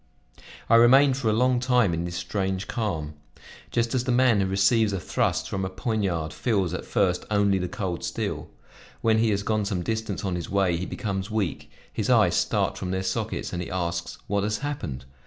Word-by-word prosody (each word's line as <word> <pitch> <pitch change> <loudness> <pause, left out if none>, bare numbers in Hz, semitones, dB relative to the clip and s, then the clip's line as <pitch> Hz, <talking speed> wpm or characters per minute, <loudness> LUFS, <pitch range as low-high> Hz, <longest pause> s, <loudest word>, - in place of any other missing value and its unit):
I 115 - +6
remained 130 +3 +6
for 120 -5 0
a - - +2
long 125 +2 +3
time 125 -7 +2
in 85 +1 -2
this 85 0 -5
strange 95 +2 -2
calm. 85 -10 -3 0.6
Just 115 -1 0
as 125 -2 +1
the 125 - -1
man 120 -4 +4
who 95 - +1
receives 100 +3 +3
a 95 - -1
thrust - - -1
from 95 -1 -3
a 95 - -2
poignard 95 -6 -2
feels, 100 -8 0
at 90 - -4
first 90 -3 +1
only 100 -2 +2
the 90 - -2
cold 90 -1 -4
steel; - - -3 0.5
when 110 -1 +3
he 115 0 +3
has 100 -1 0
gone 110 0 0
some 95 -3 -2
distance 110 +1 -3
on 95 - -1
his 85 - -5
way 95 -3 +2
he 90 +2 -3
becomes 95 -1 -3
weak, 110 -6 -2 0.2
his - - -2
eyes - - +5
start - - 0
from 90 - -4
their 95 +1 -1
sockets 95 - -3
and 90 - -2
he 90 - -5
asks 85 -2 -3
what 100 0 0
has 105 +1 0
happened. 80 - -4
100 Hz, 205 wpm, -25 LUFS, 90-115 Hz, 0.6 s, I